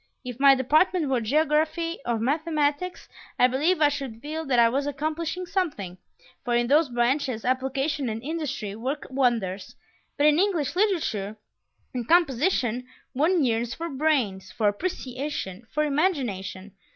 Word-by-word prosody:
If 250 0 -6
my 275 0 +7
department 305 +5 +2
were 255 -3 +1
geography 310 +6 +1
or 235 -1 +1
mathematics, 300 +6 -1 0.3
I - - +5
believe 300 +8 +1
I 295 - +6
should 275 -6 -5
feel 310 +5 -5
that 255 -2 +2
I 235 -1 +7
was 275 +4 -1
accomplishing 315 +5 -3
something, 295 - -3 0.4
for 240 -1 0
in 240 0 +2
those 295 +3 +3
branches 240 0 0
application 265 +2 0
and 220 0 -3
industry 275 -9 -4
work 265 +6 -4
wonders; 230 -8 0 0.4
but 290 - +3
in 300 +1 +5
English 350 -7 +1
literature 320 - 0 0.6
and 245 -2 -4
composition 265 - +2 0.3
one 315 +5 +2
yearns 235 0 -1
for 335 +1 -5
brains, 265 -10 0
for 215 - 0
appreciation, 250 - -3
for 305 - +1
imagination! 240 - -1
275 Hz, 140 wpm, -26 LUFS, 235-315 Hz, 0.6 s, my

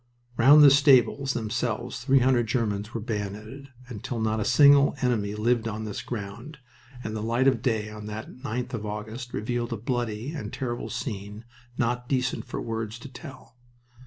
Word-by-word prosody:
Round 140 +6 +7
the 140 - +9
stables 140 -1 +4
themselves 115 +1 -3
three 135 +1 +4
hundred 125 -2 +3
Germans 105 -3 -1
were 115 - -4
bayoneted, 110 +5 -5 0.2
until 120 0 -5
not 110 0 0
a - - 0
single 140 +4 +6
enemy 105 -5 0
lived 115 +1 +1
on 110 0 -4
this 105 -2 -5
ground, 120 +7 -7 0.5
and 110 0 -4
the 110 - -3
light 120 +4 +1
of 130 -4 +3
day 110 -4 -1
on 105 0 -8
that 105 +2 -6
9th 125 0 -5
of 115 -3 -3
August 110 +4 -6
revealed 120 +3 -2
a 115 - -2
bloody 120 +2 -3
and 160 -3 -6
terrible 120 -3 -4
scene, 105 -2 -5 0.3
not 120 -1 -1
decent 130 -1 -1
for - - -5
words 115 -1 -4
to 125 +3 -10
tell. 130 -2 -12
120 Hz, 170 wpm, -26 LUFS, 110-130 Hz, 0.5 s, the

